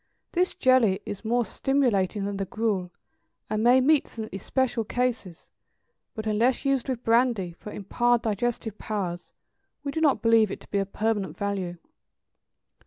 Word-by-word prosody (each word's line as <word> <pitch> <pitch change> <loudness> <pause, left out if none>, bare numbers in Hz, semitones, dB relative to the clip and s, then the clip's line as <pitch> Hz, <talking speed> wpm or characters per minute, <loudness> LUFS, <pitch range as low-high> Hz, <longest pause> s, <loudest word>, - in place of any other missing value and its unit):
This 360 +1 +1
jelly 250 -7 +4
is 205 - -6
more 240 +1 +1
stimulating 215 -9 +1
than 200 0 -3
the 195 - -2
gruel, 195 -2 -1 0.6
and 215 0 0
may 245 +2 +6
meet 290 +2 +3
some 220 -1 -7
especial 240 +4 -1
cases; 235 -6 -3 0.6
but, 220 -2 -5
unless 230 +6 +1
used 275 -2 +1
with 250 -2 -3
brandy, 230 -6 +2
for 210 - -8
impaired 240 +4 +1
digestive 220 0 -2
powers, 185 -5 -4 0.5
we 280 - -3
do 320 - -2
not 295 -4 +3
believe 225 -2 +5
it - - -5
to - - -15
be 200 - +1
of 195 0 -3
permanent 215 -3 -1
value. 195 -4 -3
225 Hz, 155 wpm, -26 LUFS, 200-250 Hz, 0.6 s, may